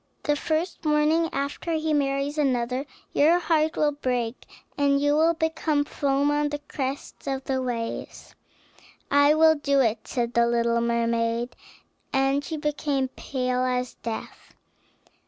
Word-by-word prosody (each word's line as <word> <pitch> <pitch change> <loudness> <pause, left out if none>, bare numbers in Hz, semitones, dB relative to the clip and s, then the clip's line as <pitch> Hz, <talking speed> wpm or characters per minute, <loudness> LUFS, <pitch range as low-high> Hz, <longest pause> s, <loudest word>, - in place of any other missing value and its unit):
The 295 - +2
first 320 +5 -2
morning 310 +2 +2
after 280 +4 -3
he 315 -1 0
marries 280 +1 0
another 255 -1 0 0.3
your 315 +4 +5
heart 320 -3 +1
will 300 -1 +3
break, 250 -4 -3 0.3
and 280 -1 +2
you 290 +1 +2
will 325 +2 +3
become 320 -2 0
foam 285 0 +1
on 295 0 +1
the 295 - -3
crest 280 -1 -6
of 270 -1 -2
the 260 -1 -1
waves." 235 -2 -5 0.8
"I 285 +1 +5
will 320 0 +6
do 280 -2 +1
it," 230 -4 +1
said 240 -2 -2
the 235 -1 +4
little 235 0 +1
mermaid, 235 0 0 0.6
and 270 +1 +2
she 315 +2 -4
became 290 -3 -1
pale 255 -1 -2
as 250 -1 -1
death. 225 -1 -7
280 Hz, 140 wpm, -25 LUFS, 250-300 Hz, 0.8 s, will